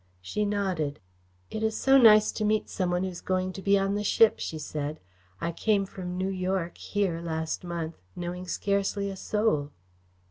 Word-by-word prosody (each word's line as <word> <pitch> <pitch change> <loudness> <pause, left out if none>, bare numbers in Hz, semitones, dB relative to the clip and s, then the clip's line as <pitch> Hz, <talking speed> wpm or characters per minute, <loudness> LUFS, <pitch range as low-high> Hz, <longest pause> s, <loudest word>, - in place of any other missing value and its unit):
She 150 - -2
nodded. 185 -8 -1 0.5
"It 220 - -3
is 220 0 0
so 270 0 +4
nice 215 -3 +7
to 215 - -3
meet 215 0 +1
some 185 -2 -1
one 180 +1 0
who 190 - -1
is 175 -2 -8
going 185 0 -1
to 195 - -7
be 200 +1 +4
on 195 0 +1
the 205 0 -1
ship," 220 +2 +4
she 160 - -4
said. 150 0 -4 0.4
"I 170 - -1
came 200 +3 +1
from 180 -2 -6
New 190 +1 0
York 185 -2 -2
here 190 -5 -1
last 160 0 -3
month, 170 -2 -4 0.2
knowing 180 +1 -5
scarcely 200 +2 0
a - - -6
soul." 200 -8 0
185 Hz, 185 wpm, -28 LUFS, 170-205 Hz, 0.5 s, nice